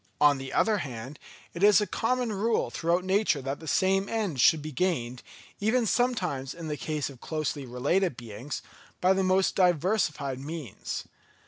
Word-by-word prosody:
On 145 Hz, -2 st, +5 dB
the 135 Hz, 0 st, -6 dB
other 215 Hz, -2 st, +2 dB
hand, 130 Hz, -1 st, -7 dB, 0.3 s
it 170 Hz, -, -6 dB
is 205 Hz, 0 st, +7 dB
a 210 Hz, -, +1 dB
common 245 Hz, +1 st, -1 dB
rule 220 Hz, +3 st, 0 dB
throughout 170 Hz, +2 st, 0 dB
nature 190 Hz, -4 st, +2 dB
that 135 Hz, +1 st, -4 dB
the 160 Hz, -, -10 dB
same 195 Hz, +5 st, +2 dB
end 205 Hz, -, -1 dB
should 155 Hz, +3 st, +5 dB
be 155 Hz, -, -5 dB
gained, 125 Hz, -7 st, -1 dB, 0.4 s
even 225 Hz, +4 st, +2 dB
sometimes 185 Hz, -, 0 dB
in 165 Hz, -2 st, -6 dB
the 150 Hz, -, -1 dB
case 150 Hz, +1 st, -3 dB
of 130 Hz, -, -15 dB
closely 155 Hz, -3 st, -3 dB
related 145 Hz, +7 st, 0 dB
beings, 120 Hz, +4 st, -6 dB, 0.4 s
by 185 Hz, +1 st, +4 dB
the 190 Hz, 0 st, +1 dB
most 185 Hz, +1 st, +3 dB
diversified 170 Hz, -6 st, +1 dB
means. 150 Hz, -, -5 dB
165 Hz, 165 wpm, -28 LUFS, 140-195 Hz, 0.4 s, is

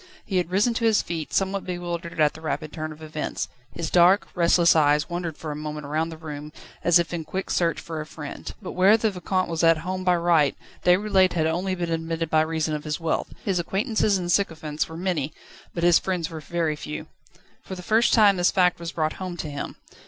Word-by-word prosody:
He 190 Hz, -, -1 dB
had 175 Hz, -2 st, 0 dB
risen 205 Hz, +6 st, +2 dB
to 230 Hz, 0 st, -1 dB
his 220 Hz, -2 st, +4 dB
feet, 165 Hz, -2 st, -4 dB
somewhat 195 Hz, 0 st, 0 dB
bewildered 175 Hz, -2 st, -5 dB
at 150 Hz, -1 st, +4 dB
the 160 Hz, -, -12 dB
rapid 155 Hz, -1 st, -3 dB
turn 155 Hz, 0 st, -4 dB
of 155 Hz, +1 st, -11 dB
events. 155 Hz, -1 st, -4 dB, 0.2 s
His 165 Hz, -2 st, -4 dB
dark, 180 Hz, +3 st, +5 dB
restless 170 Hz, -1 st, +4 dB
eyes 150 Hz, -1 st, +3 dB
wandered 175 Hz, -2 st, -4 dB
for 155 Hz, -, -5 dB
a -, -, -4 dB
moment 150 Hz, 0 st, -5 dB
round 155 Hz, +3 st, -1 dB
the 160 Hz, -, -8 dB
room, 150 Hz, -1 st, -7 dB, 0.3 s
as 175 Hz, 0 st, +6 dB
if 170 Hz, 0 st, -1 dB
in 170 Hz, -2 st, -3 dB
quick 190 Hz, +5 st, -4 dB
search 170 Hz, -2 st, +1 dB
for 160 Hz, -2 st, -5 dB
a -, -, -6 dB
friend. 150 Hz, -2 st, -7 dB
But 185 Hz, -, -5 dB
where 195 Hz, +4 st, +5 dB
the 220 Hz, -1 st, +1 dB
Vicomte 185 Hz, 0 st, -1 dB
was 165 Hz, 0 st, -2 dB
at 165 Hz, -1 st, +6 dB
home 185 Hz, 0 st, -3 dB
by 180 Hz, -1 st, +3 dB
right, 170 Hz, -5 st, +3 dB, 0.3 s
Déroulède 190 Hz, +1 st, +4 dB
had 160 Hz, -2 st, +1 dB
only 180 Hz, +4 st, 0 dB
been 175 Hz, -2 st, -3 dB
admitted 165 Hz, 0 st, -2 dB
by 155 Hz, -, +5 dB
reason 160 Hz, -1 st, -1 dB
of 150 Hz, -1 st, -3 dB
his 150 Hz, +1 st, -3 dB
wealth. 165 Hz, -1 st, -1 dB
His 190 Hz, -3 st, +1 dB
acquaintances 205 Hz, +3 st, +1 dB
and 175 Hz, -1 st, -2 dB
sycophants 160 Hz, -6 st, 0 dB
were 160 Hz, -, -8 dB
many, 165 Hz, -5 st, -2 dB, 0.4 s
but 170 Hz, -, -4 dB
his 175 Hz, -1 st, +6 dB
friends 180 Hz, -4 st, -2 dB
very 160 Hz, 0 st, -2 dB
few. 150 Hz, 0 st, -6 dB, 0.6 s
For 190 Hz, -, -7 dB
the 180 Hz, -, -9 dB
first 220 Hz, +5 st, +3 dB
time 205 Hz, -4 st, +5 dB
this 175 Hz, 0 st, +3 dB
fact 180 Hz, -2 st, +2 dB
was 170 Hz, -1 st, -6 dB
brought 155 Hz, -1 st, 0 dB
home 180 Hz, -2 st, -4 dB
to 155 Hz, -3 st, -5 dB
him. 140 Hz, -, -5 dB
170 Hz, 220 wpm, -25 LUFS, 155-185 Hz, 0.6 s, as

